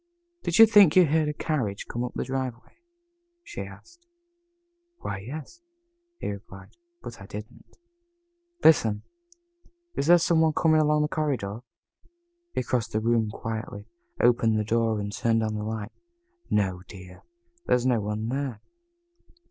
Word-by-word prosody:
"Did 170 Hz, -, 0 dB
you 225 Hz, -, +11 dB
think 205 Hz, -7 st, +6 dB
you 185 Hz, -1 st, +7 dB
heard 155 Hz, 0 st, +1 dB
a -, -, -2 dB
carriage 125 Hz, -11 st, -2 dB
come 120 Hz, -, -3 dB
up 125 Hz, -, -4 dB
the -, -, -1 dB
driveway?" 130 Hz, -, -5 dB, 0.6 s
she 415 Hz, -, -7 dB
asked. 345 Hz, 0 st, -12 dB, 0.9 s
"Why, 100 Hz, -, -5 dB
yes," 150 Hz, -, -9 dB, 0.6 s
he -, -, -3 dB
replied, 100 Hz, 0 st, -11 dB, 0.3 s
"but 120 Hz, -4 st, -9 dB
I 95 Hz, -, -10 dB
didn't." 105 Hz, +2 st, -10 dB, 0.9 s
"Listen! 110 Hz, -9 st, +4 dB, 0.9 s
Is 140 Hz, -, -2 dB
there 175 Hz, +1 st, +8 dB
some 165 Hz, -1 st, +2 dB
one 160 Hz, -1 st, +3 dB
coming 155 Hz, -1 st, +3 dB
along 150 Hz, 0 st, +3 dB
the -, -, +1 dB
corridor?" 135 Hz, -10 st, -2 dB, 0.9 s
He -, -, -2 dB
crossed 115 Hz, -2 st, -2 dB
the 110 Hz, -, +1 dB
room 115 Hz, -1 st, +1 dB
quietly, 110 Hz, -1 st, -6 dB, 0.3 s
opened 115 Hz, -2 st, +3 dB
the 105 Hz, -, +1 dB
door, 115 Hz, 0 st, +1 dB
and 100 Hz, 0 st, -4 dB
turned 115 Hz, 0 st, +1 dB
on 110 Hz, 0 st, -1 dB
the 105 Hz, -, -3 dB
light. 110 Hz, +1 st, -4 dB, 0.6 s
"No, 95 Hz, -3 st, 0 dB
dear. 90 Hz, -2 st, -12 dB, 0.5 s
There -, -, +4 dB
is 125 Hz, 0 st, -1 dB
no 120 Hz, -4 st, +2 dB
one 105 Hz, +2 st, -3 dB
there." 135 Hz, -4 st, -3 dB
115 Hz, 150 wpm, -26 LUFS, 105-150 Hz, 0.9 s, you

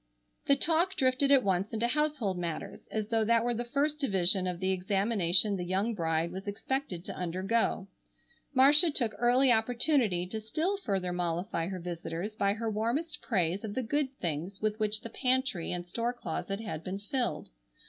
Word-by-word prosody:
The 280 Hz, -, +6 dB
talk 335 Hz, +6 st, +2 dB
drifted 260 Hz, -2 st, +2 dB
at 275 Hz, -2 st, +6 dB
once 190 Hz, +1 st, 0 dB
into 225 Hz, +2 st, 0 dB
household 290 Hz, -7 st, 0 dB
matters, 170 Hz, -2 st, -5 dB
as 215 Hz, -1 st, -3 dB
though 225 Hz, -1 st, +2 dB
that 230 Hz, +1 st, +2 dB
were 240 Hz, -, +1 dB
the 235 Hz, +1 st, -2 dB
first 290 Hz, +4 st, 0 dB
division 190 Hz, -, +2 dB
of 180 Hz, -1 st, -3 dB
the 190 Hz, 0 st, 0 dB
examination 195 Hz, 0 st, +3 dB
the 180 Hz, -, -3 dB
young 190 Hz, +6 st, -1 dB
bride 165 Hz, -3 st, -1 dB
was 190 Hz, +2 st, -7 dB
expected 205 Hz, -3 st, -3 dB
to -, -, -6 dB
undergo. 190 Hz, +3 st, -1 dB, 0.6 s
Marcia 290 Hz, +5 st, +6 dB
took 240 Hz, -7 st, 0 dB
early 250 Hz, +2 st, +4 dB
opportunity 230 Hz, -, +2 dB
to 220 Hz, +4 st, -5 dB
still 320 Hz, -, -1 dB
further 190 Hz, -, -2 dB
mollify 175 Hz, 0 st, -2 dB
her 190 Hz, -1 st, -5 dB
visitors 175 Hz, +3 st, -5 dB
by 200 Hz, -2 st, +1 dB
her 225 Hz, +2 st, -4 dB
warmest 235 Hz, +10 st, -2 dB
praise 185 Hz, -3 st, 0 dB
of 205 Hz, -2 st, -5 dB
the 260 Hz, -, -1 dB
good 285 Hz, +3 st, -1 dB
things 170 Hz, +4 st, -4 dB
with 215 Hz, 0 st, -1 dB
which 215 Hz, 0 st, 0 dB
the 230 Hz, -, -7 dB
pantry 255 Hz, -9 st, 0 dB
and 175 Hz, -1 st, -4 dB
store 230 Hz, +7 st, -2 dB
closet 195 Hz, -1 st, -4 dB
had 205 Hz, -8 st, -6 dB
been 185 Hz, +3 st, -4 dB
filled. 240 Hz, -, -3 dB
215 Hz, 180 wpm, -30 LUFS, 185-255 Hz, 0.6 s, The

